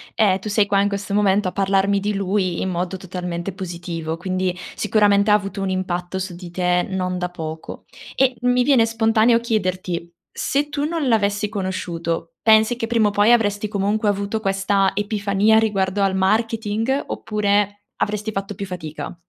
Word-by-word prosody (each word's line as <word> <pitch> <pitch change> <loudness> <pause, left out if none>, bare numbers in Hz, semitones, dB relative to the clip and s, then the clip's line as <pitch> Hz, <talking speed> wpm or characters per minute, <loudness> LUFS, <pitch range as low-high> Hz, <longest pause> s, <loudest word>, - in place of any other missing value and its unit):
ehm, 195 -4 +3
tu 210 +3 -6
sei 205 0 +3
qua 200 -1 +2
in 205 - +2
questo 200 0 -4
momento 200 -1 +2
a - - -3
parlarmi 195 0 +2
di 210 +1 -1
lui 190 -2 -1
in - - -1
modo 180 +1 -2
totalmente 180 0 -5
positivo, 170 -3 -5
quindi 185 0 -1 0.2
sicuramente 205 -1 +3
ha - - +7
avuto 195 -1 0
un 195 - -1
impatto 185 0 -2
su 185 -2 -5
di 175 -1 -10
te 180 0 +1
non 185 -1 -2
da 180 0 -2
poco. 160 -2 -7 0.3
E 260 -1 +3
mi 250 0 +3
viene 245 -4 +4
spontaneo 225 +1 +3
chiederti: 185 -6 -2 0.2
se 285 +2 -1
tu 290 -1 -3
non 315 -3 -1
l'avessi 205 -2 +1
conosciuto, 170 -4 -3
pensi 220 +1 +5
che 230 -1 -3
prima 225 -2 +2
o - - 0
poi 205 +3 +4
avresti 205 -3 +2
comunque 205 +1 0
avuto 200 +2 -2
questa 195 -1 +1
epifania 205 +1 +2
riguardo 200 -3 +1
al 195 -1 +2
marketing, 225 +5 0
oppure 205 -1 0 0.2
avresti 210 +1 -1
fatto 195 0 -4
più 200 - -5
fatica? 175 -4 -6
200 Hz, 170 wpm, -21 LUFS, 185-215 Hz, 0.3 s, ha